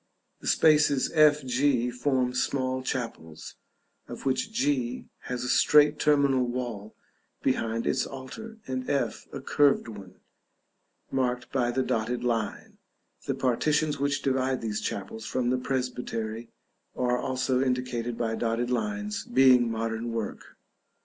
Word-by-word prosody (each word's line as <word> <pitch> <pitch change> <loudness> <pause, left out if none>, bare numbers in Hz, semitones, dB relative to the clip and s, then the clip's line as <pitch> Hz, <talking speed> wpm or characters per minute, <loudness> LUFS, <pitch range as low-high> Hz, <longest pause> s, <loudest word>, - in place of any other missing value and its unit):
The - - -8
spaces 150 -3 +4
F 150 -3 +5
G 125 -1 +1
form 125 0 0
small 130 0 -1
chapels, 115 - -5 0.5
of - - -9
which 135 - 0
G 255 0 -1 0.2
has 125 -1 -3
a - - -3
straight 150 +3 +5
terminal 140 -3 +3
wall 120 -4 -5 0.5
behind 115 -3 0
its 130 - +1
altar, 140 +13 -9
and 130 -1 -4
F 140 - -1
a 140 - -5
curved 140 -1 +3
one, 100 -4 -10 1.0
marked 125 -2 -1
by 125 -3 +1
the 130 +2 0
dotted 115 +2 -1
line; 115 -3 -2 0.5
the - - 0
partitions 145 +4 +1
which 140 0 0
divide 130 -1 0
these 110 -2 -2
chapels 105 +2 -5
from 125 -1 0
the 130 - +1
presbytery 120 -3 -3 0.5
are 125 -1 +1
also 130 0 0
indicated 125 -2 -1
by 115 -1 -1
dotted 115 +2 -1
lines, 210 +7 -2
being 130 - +5
modern 115 +1 -3
work. 115 -2 -5
130 Hz, 130 wpm, -27 LUFS, 120-140 Hz, 1.0 s, F